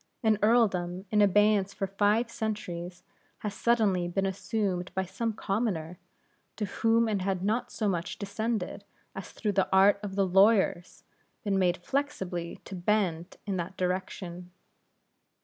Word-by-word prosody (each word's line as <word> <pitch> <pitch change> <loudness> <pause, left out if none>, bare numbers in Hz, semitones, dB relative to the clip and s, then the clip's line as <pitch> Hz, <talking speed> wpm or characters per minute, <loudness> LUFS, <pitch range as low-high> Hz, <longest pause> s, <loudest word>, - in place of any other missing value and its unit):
An 220 -2 +3
earldom, 195 -5 +2
in 210 -1 +4
abeyance 205 0 +3
for 195 - -1
five 205 +4 +1
centuries, 185 -6 -4 0.3
has 210 -2 -4
suddenly 205 -6 +2
been 195 +3 -1
assumed 190 -2 -2
by 190 0 0
some 205 +5 -2
commoner, 195 -6 -2 0.6
to 210 - -2
whom 225 +3 +2
it 205 -3 0
had 190 -1 -1
not 220 +5 0
so 215 - -1
much 175 -3 -2
descended, 210 -1 -3 0.3
as 195 - -8
through 210 - -2
the 195 -1 +1
art 195 +1 +5
of 200 -2 -5
the 195 -1 +3
lawyers 190 -1 +3 0.4
been 200 -3 +1
made 180 -1 +2
flexibly 185 -8 -3
to - - -9
bend 180 -3 0
in 200 -2 -2
that 180 +2 -5
direction. 180 -1 -3
195 Hz, 145 wpm, -29 LUFS, 180-215 Hz, 0.6 s, art